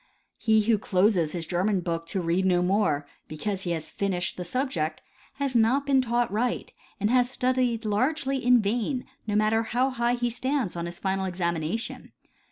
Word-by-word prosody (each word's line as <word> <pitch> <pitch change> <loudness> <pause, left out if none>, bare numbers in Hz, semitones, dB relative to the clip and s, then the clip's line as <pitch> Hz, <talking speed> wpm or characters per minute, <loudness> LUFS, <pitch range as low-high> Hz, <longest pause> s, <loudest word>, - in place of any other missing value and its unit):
He 220 -2 +3
who 220 -1 +2
closes 185 -5 +2
his 170 -2 -3
German 185 +3 0
book 165 -1 -3
to 185 +3 -2
read 170 +3 +1
no 180 -1 +3
more 180 -7 +1 0.2
because 190 +5 -3
he 175 - -1
has 160 -1 -5
finished 185 -3 -2
the 180 - -5
subject 175 - -2 0.3
has 275 -2 -2
not 240 +5 +3
been 275 -2 +4
taught 240 -2 0
right 235 +4 -1 0.3
and 210 +2 +1
has 250 -1 +3
studied 250 -3 0
largely 265 +5 0
in 245 -2 +5
vain, 240 +5 -1 0.2
no 205 - 0
matter 215 +1 +3
how 245 +4 0
high 240 -1 +1
he 240 -1 -1
stands 255 -4 -1
on 170 0 -3
his 175 0 -7
final 190 0 -1
examination. 175 +2 -3
215 Hz, 175 wpm, -26 LUFS, 180-245 Hz, 0.3 s, in